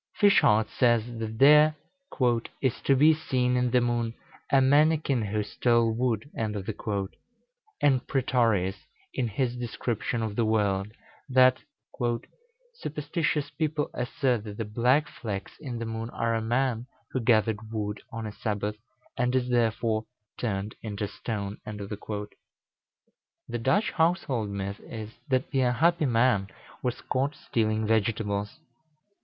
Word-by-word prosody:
Fischart 110 Hz, -, +5 dB
says, 120 Hz, -1 st, +2 dB
that 110 Hz, 0 st, -4 dB
there 150 Hz, +3 st, +7 dB, 0.8 s
"is 130 Hz, -3 st, -1 dB
to 135 Hz, -, +3 dB
be 150 Hz, +4 st, +6 dB
seen 130 Hz, -5 st, 0 dB
in 125 Hz, 0 st, +2 dB
the 125 Hz, +1 st, +4 dB
moon 120 Hz, -1 st, -1 dB, 0.4 s
a 135 Hz, -, +6 dB
manikin 145 Hz, -3 st, +3 dB
who 105 Hz, +1 st, -1 dB
stole 115 Hz, +2 st, +2 dB
wood;" 115 Hz, 0 st, 0 dB
and 110 Hz, -2 st, -2 dB, 1.5 s
Prætorius, 115 Hz, -8 st, +1 dB, 0.4 s
in 125 Hz, -, 0 dB
his 120 Hz, +3 st, -1 dB
description 120 Hz, -1 st, -2 dB
of 110 Hz, -2 st, -3 dB
the 115 Hz, -, +2 dB
world, 100 Hz, -3 st, +1 dB, 0.4 s
that 130 Hz, 0 st, +5 dB, 1.1 s
"superstitious 150 Hz, -, -2 dB
people 155 Hz, -2 st, -1 dB
assert 125 Hz, -2 st, 0 dB
that 105 Hz, -1 st, -7 dB
the 115 Hz, -, -2 dB
black 125 Hz, +8 st, +2 dB
flecks 100 Hz, -4 st, -6 dB
in 130 Hz, -6 st, -5 dB
the 115 Hz, -, -4 dB
moon 115 Hz, 0 st, -4 dB
are 115 Hz, -1 st, -1 dB
a 115 Hz, -, 0 dB
man 120 Hz, +1 st, 0 dB, 0.2 s
who 130 Hz, -, -1 dB
gathered 110 Hz, -2 st, +2 dB
wood 105 Hz, -2 st, -3 dB
on 115 Hz, -1 st, -5 dB
a 105 Hz, -, -4 dB
Sabbath, 105 Hz, 0 st, -3 dB, 0.4 s
and 125 Hz, +1 st, +1 dB
is 125 Hz, -1 st, +1 dB
therefore 115 Hz, -2 st, +1 dB, 0.3 s
turned 105 Hz, -2 st, -3 dB
into 105 Hz, -2 st, -3 dB
stone." 100 Hz, -2 st, -5 dB
The 105 Hz, 0 st, -5 dB, 1.3 s
Dutch 135 Hz, -, +2 dB
household 160 Hz, -, +1 dB
myth 100 Hz, 0 st, -4 dB
is, 110 Hz, -1 st, -8 dB, 0.2 s
that 130 Hz, -1 st, 0 dB
the 135 Hz, -2 st, +2 dB
unhappy 155 Hz, +6 st, +3 dB
man 115 Hz, -5 st, +3 dB, 0.3 s
was 125 Hz, -2 st, -2 dB
caught 140 Hz, +3 st, -1 dB
stealing 110 Hz, -4 st, 0 dB
vegetables. 105 Hz, -2 st, 0 dB
115 Hz, 130 wpm, -27 LUFS, 110-130 Hz, 1.5 s, there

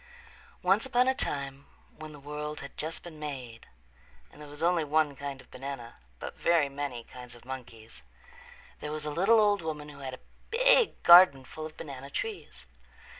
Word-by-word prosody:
Once 195 Hz, +4 st, +4 dB
upon 250 Hz, -1 st, +2 dB
a 260 Hz, -, +4 dB
time 140 Hz, -, -2 dB, 0.3 s
when 155 Hz, 0 st, -9 dB
the 150 Hz, -, -11 dB
world 150 Hz, +1 st, -6 dB
had 140 Hz, -, -10 dB
just 160 Hz, +2 st, -5 dB
been 165 Hz, -3 st, -10 dB
made 130 Hz, -6 st, -7 dB, 0.6 s
and -, -, -15 dB
there 150 Hz, -, -10 dB
was 145 Hz, +2 st, -7 dB
only 170 Hz, -1 st, +3 dB
one 150 Hz, -1 st, +1 dB
kind 140 Hz, 0 st, -6 dB
of -, -, -17 dB
banana, 135 Hz, -3 st, -7 dB, 0.2 s
but -, -, -7 dB
very 165 Hz, -4 st, +3 dB
many 140 Hz, -4 st, -4 dB
kinds 125 Hz, 0 st, -11 dB
of 120 Hz, -, -17 dB
monkeys, 115 Hz, -, -9 dB, 0.8 s
there 150 Hz, -, -5 dB
was 155 Hz, 0 st, -4 dB
a 150 Hz, -, -2 dB
little 195 Hz, +9 st, +4 dB
old 205 Hz, -1 st, +3 dB
woman 150 Hz, -2 st, -5 dB
who 140 Hz, -1 st, -12 dB
had 130 Hz, -2 st, -5 dB
a -, -, -24 dB, 0.2 s
big -, -, +4 dB
garden 170 Hz, -7 st, +8 dB
full 155 Hz, +3 st, -7 dB
of 155 Hz, -, -17 dB
banana 140 Hz, -2 st, -8 dB
trees. 170 Hz, -, -5 dB
150 Hz, 180 wpm, -29 LUFS, 135-170 Hz, 0.8 s, garden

